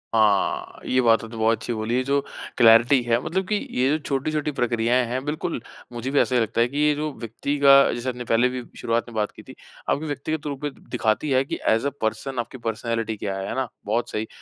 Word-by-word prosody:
हाँ, 105 Hz, -3 st, +2 dB
ये 130 Hz, -, +1 dB
बातें 115 Hz, -1 st, +3 dB
तो 115 Hz, -, -9 dB
बहुत 110 Hz, +1 st, +2 dB
अच्छी 120 Hz, +2 st, -4 dB
बोली 110 Hz, +1 st, -2 dB
है 130 Hz, -, +1 dB
जो 140 Hz, +2 st, +1 dB, 0.4 s
क्लैरिटी 120 Hz, +3 st, +6 dB
है 120 Hz, 0 st, +2 dB
मतलब 190 Hz, +2 st, -2 dB
कि 210 Hz, -, +1 dB, 0.2 s
ये 130 Hz, +1 st, +3 dB
जो 150 Hz, -, +2 dB
छोटी-छोटी 150 Hz, +1 st, -1 dB
प्रक्रियाएँ 120 Hz, +1 st, +2 dB
हैं 125 Hz, +3 st, -3 dB
बिल्कुल, 155 Hz, -2 st, -3 dB, 0.3 s
मुझे 120 Hz, +3 st, -4 dB
भी 140 Hz, -, +3 dB
ऐसा 130 Hz, -, +2 dB
ही 120 Hz, -, +4 dB
लगता 115 Hz, +1 st, 0 dB
है 120 Hz, -, +4 dB
कि 140 Hz, +4 st, -7 dB
ये 150 Hz, 0 st, +4 dB
जो 150 Hz, +1 st, -2 dB
व्यक्ति 120 Hz, +5 st, -3 dB
का 140 Hz, 0 st, +7 dB
जैसे 120 Hz, +2 st, -3 dB
आपने 125 Hz, -1 st, -5 dB
पहले 120 Hz, +2 st, +3 dB
भी 125 Hz, 0 st, -5 dB, 0.2 s
शुरुआत 115 Hz, +1 st, -1 dB
में -, -, -12 dB
बात 105 Hz, -1 st, 0 dB
की -, -, -14 dB
थी -, -, -13 dB, 0.3 s
आपके 150 Hz, -, 0 dB
व्यक्तिगत 150 Hz, +1 st, -3 dB
रूप 140 Hz, -1 st, -5 dB
में 145 Hz, -, -1 dB, 0.2 s
दिखाती 120 Hz, +3 st, 0 dB
है 130 Hz, 0 st, +4 dB
कि -, -, -4 dB
एज़ 115 Hz, +5 st, +2 dB
ए -, -, +2 dB
पर्सन 125 Hz, +4 st, -2 dB
आपकी 120 Hz, +2 st, -5 dB
पर्सनैलिटी 115 Hz, -1 st, -3 dB
क्या 100 Hz, -1 st, -3 dB
है, 95 Hz, 0 st, -4 dB
है -, -, -4 dB
ना? 130 Hz, -1 st, -1 dB, 0.2 s
बहुत 115 Hz, +3 st, -1 dB
सही 110 Hz, +1 st, -3 dB
120 Hz, 235 wpm, -24 LUFS, 115-140 Hz, 0.4 s, का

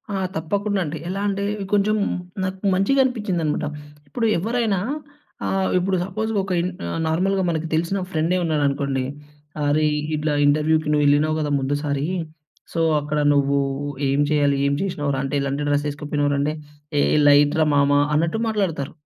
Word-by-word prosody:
ఆ! -, -, 0 dB, 0.2 s
తప్పకుండా 200 Hz, +5 st, -1 dB
అండి. 150 Hz, +2 st, -4 dB
ఎలా 195 Hz, +2 st, -3 dB
అంటే 200 Hz, 0 st, -1 dB, 0.3 s
కొంచెం 205 Hz, +1 st, +3 dB, 0.5 s
నాకు 190 Hz, +2 st, -3 dB
మంచిగా 200 Hz, +9 st, +2 dB
అనిపించిందన్నమాట. 195 Hz, -11 st, -1 dB, 0.4 s
ఇప్పుడు 230 Hz, -, -2 dB
ఎవ్వరైనా 220 Hz, 0 st, 0 dB, 0.7 s
ఆహ్, 190 Hz, 0 st, 0 dB
ఇప్పుడు 185 Hz, +1 st, +1 dB
సపోజ్ 215 Hz, +4 st, -3 dB
ఒక 190 Hz, 0 st, -5 dB
ఇన్ 175 Hz, +2 st, 0 dB, 0.2 s
ఆహ్, 85 Hz, -, -3 dB
నార్మల్‌గా 190 Hz, +4 st, +1 dB
మనకు 165 Hz, -1 st, -2 dB
తెలిసిన 170 Hz, +5 st, 0 dB
ఫ్రెండే 165 Hz, +3 st, +1 dB
ఉన్నాడనుకోండి, 140 Hz, -4 st, 0 dB, 0.6 s
అరే! 150 Hz, +2 st, +2 dB, 0.3 s
ఇట్లా 150 Hz, 0 st, -1 dB
ఇంటర్వ్యూ‌కి 155 Hz, +1 st, +2 dB
నువ్వెళ్ళినవు 150 Hz, +1 st, +3 dB
గదా! 150 Hz, -1 st, -1 dB
ముందుసారీ 145 Hz, +1 st, -1 dB, 0.7 s
సో, 165 Hz, -, -1 dB, 0.2 s
అక్కడ 150 Hz, +1 st, -2 dB
నువ్వూ 140 Hz, 0 st, +2 dB, 0.5 s
ఏం 140 Hz, +2 st, +2 dB
చేయాలి, 145 Hz, -2 st, +2 dB
ఏం 140 Hz, -, +1 dB
చేసినావు 150 Hz, -7 st, -2 dB
రా, -, -, -2 dB
అంటే 135 Hz, +2 st, -3 dB
ఎలాంటి 140 Hz, +1 st, -2 dB
డ్రెస్ 145 Hz, 0 st, +1 dB
ఎసుకుపోయినావు 145 Hz, 0 st, -1 dB
రా, 140 Hz, -, 0 dB
అంటే 150 Hz, +2 st, 0 dB, 0.5 s
ఏ -, -, +4 dB, 0.2 s
లైట్ 145 Hz, 0 st, +6 dB
రా 155 Hz, -, +4 dB
మామా 145 Hz, 0 st, +4 dB, 0.2 s
అన్నట్టు 165 Hz, +7 st, +1 dB
మాట్లాడతారు. 185 Hz, -10 st, -1 dB
155 Hz, 150 wpm, -22 LUFS, 145-190 Hz, 0.7 s, లైట్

